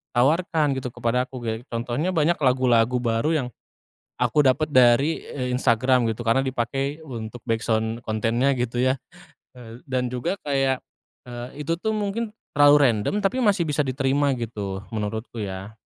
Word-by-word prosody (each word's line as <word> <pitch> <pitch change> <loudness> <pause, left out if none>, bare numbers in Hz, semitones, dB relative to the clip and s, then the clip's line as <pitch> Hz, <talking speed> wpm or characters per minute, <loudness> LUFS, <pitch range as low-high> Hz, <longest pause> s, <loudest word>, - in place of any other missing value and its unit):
tawarkan 155 +3 +2
gitu 125 - -5
kepada 125 +2 0
aku 130 -2 -9
ge 115 -1 -1
contohnya, 120 +7 -2
banyak 165 +2 +2
lagu-lagu 125 -3 +3
baru 115 +5 +1
yang, 135 -5 0 0.7
aku 125 +4 +2
dapat 145 +4 +2
dari, 130 +5 +4
eee, 125 -2 -3
Instagram 125 0 +2
gitu 110 +1 -3
karena 115 +4 +3
dipakai 135 +3 -2
untuk 115 -4 -7
backsound 115 -1 -1
kontennya 115 +5 +1
gitu 120 0 -2
ya, 130 +1 +3 0.6
eee, 115 -1 -11
dan 125 -1 -1
juga 165 +10 -1
kayak, 135 -2 0 0.4
eee, 120 0 -7
itu 165 +3 -1
tuh 220 +1 -1
mungkin 210 +2 -3 0.2
terlalu 145 0 +6
random, 105 - -2
tapi 200 +7 0
masih 205 -4 +3
bisa 150 0 0
diterima 135 +2 +1
gitu, 105 -5 -5
menurutku 110 +2 -4
ya. 100 +1 -6
125 Hz, 150 wpm, -24 LUFS, 115-145 Hz, 0.7 s, terlalu